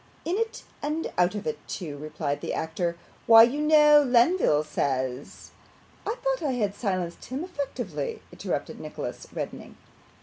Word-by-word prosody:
'In 345 - 0
it 455 +2 -2 0.2
and 305 +3 -2
out 180 +3 +2
of 210 - -5
it 150 -1 -2
too,' 160 -7 -5
replied 150 -1 -3
the - - -3
actor. 170 +1 -2 0.3
'Why, 225 0 +10
you 265 +6 +2
know, 300 -1 +7
Lenville 245 - +4
says 130 -3 -3 0.3
' - - -19
'I 435 - 0
thought - - 0
I 285 -5 0
had 210 -5 0
silenced 185 -6 -3
him 265 +5 -4
effectually,' 255 - -4
interrupted - - -4
Nicholas, - - -6
reddening. - - -6
220 Hz, 155 wpm, -27 LUFS, -, 0.3 s, Why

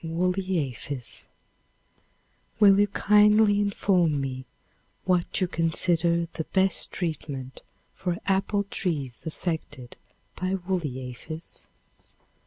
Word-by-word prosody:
Woolly 180 +3 0
Aphis. 125 +2 -6 1.3
Will 200 -2 +7
you 205 - +5
kindly 210 +1 +4
inform 185 -6 +2
me 130 -1 -4 0.6
what 180 -2 +1
you 185 - +1
consider 170 0 +1
the 160 -1 -6
best 190 0 +2
treatment 145 -6 -4 0.3
for 180 -2 -2
apple 195 +1 +1
trees 150 -10 -3
affected 155 -6 -5 0.4
by 185 +1 -1
woolly 170 -9 -3
aphis? 155 +7 -9
175 Hz, 95 wpm, -26 LUFS, 150-195 Hz, 1.3 s, Will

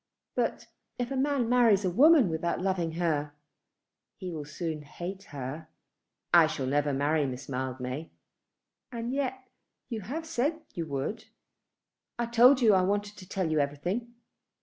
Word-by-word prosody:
But - - -1 0.3
if 245 +1 -3
a - - -1
man 270 -2 +1
marries 230 -5 +4
a - - +2
woman 285 - +6
without 165 +1 -1
loving 180 -3 -1
her, 155 -4 -1 0.8
he 185 -1 -6
will 155 -3 -5
soon 155 +1 -4
hate 180 +6 -7
her." 145 +3 -6 0.7
"I 170 -2 +8
shall 155 -4 -3
never 145 +2 +1
marry 145 +2 +1
Miss 130 +1 -6
Mildmay." 130 +2 -4 0.8
"And 235 +1 -4
yet 260 -2 -2 0.4
you 225 -3 -3
have 290 - -5
said 315 +1 -1
you 165 -2 -4
would?" 140 +9 -3 0.9
"I 240 - 0
told 245 +3 +6
you 225 - +6
that 200 - +6
I - - +4
wanted 205 +2 -1
to 185 -3 -13
tell 185 -4 -1
you 155 - +2
everything. 175 +12 -2
180 Hz, 155 wpm, -29 LUFS, 150-240 Hz, 0.9 s, I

